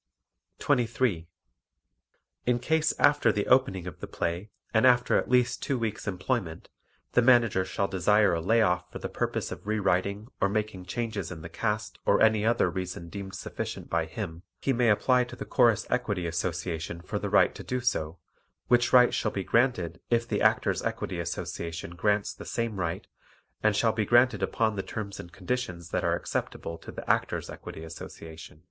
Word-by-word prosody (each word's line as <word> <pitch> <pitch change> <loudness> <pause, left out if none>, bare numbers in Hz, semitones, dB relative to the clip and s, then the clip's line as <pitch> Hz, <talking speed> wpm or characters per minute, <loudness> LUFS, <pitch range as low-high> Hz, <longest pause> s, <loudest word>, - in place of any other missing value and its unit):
23. 115 -7 +1 1.2
In 125 -1 +3
case 160 +5 +1
after 145 -5 +4
the 105 -1 -1
opening 125 -9 +3
of 90 - -8
the - - -6
play 85 +5 -3 0.2
and 110 +3 +5
after 125 0 +4
at - - +1
least 125 -1 +2
two 135 - -1
weeks' 110 -2 -3
employment 90 -2 -2 0.4
the - - +4
Manager 115 -6 +4
shall 100 +1 -1
desire 100 +2 +3
a 85 - 0
lay 110 +6 +3
off 90 -2 0
for - - -6
the - - -4
purpose - - -2
of - - -8
re 110 0 +1
writing 100 +2 0
or 100 - +3
making 105 -3 -2
changes 110 -2 -3
in 80 -3 -8
the 85 - -7
cast 105 +4 -2
or - - +3
any 110 -1 +4
other 115 +2 +3
reason 90 -2 -5
deemed 95 0 -7
sufficient - - -6
by 85 -1 +1
him, 90 -7 -6 0.2
he 135 - +1
may 120 -1 +3
apply 125 +4 +4
to 125 - -9
the - - -6
Chorus 115 -4 +3
Equity 105 -8 0
Association 85 0 -3
for - - -4
the - - -3
right - - +4
to - - -9
do 125 - -2
so, 90 -10 -1 0.5
which 120 0 +4
right 125 -1 +6
shall 105 - 0
be 100 -2 -3
granted 95 -9 +1
if 115 -1 +1
the - - -1
Actors' - - +2
Equity 90 - -3
Association 85 0 -4
grants 105 +3 0
the - - -10
same 115 -4 -2
right, 85 -2 -2 0.6
and 110 -1 +3
shall 115 +1 +3
be 110 -1 0
granted 120 -2 +4
upon 110 +3 0
the 95 - -1
terms 100 -1 -6
and 85 - -9
conditions 90 -4 -4
that - - 0
are - - +2
acceptable 85 0 -4
to - - -10
the - - -8
Actors' - - 0
Equity 80 - -9
Association. 80 -1 -10
105 Hz, 185 wpm, -28 LUFS, 90-120 Hz, 1.2 s, right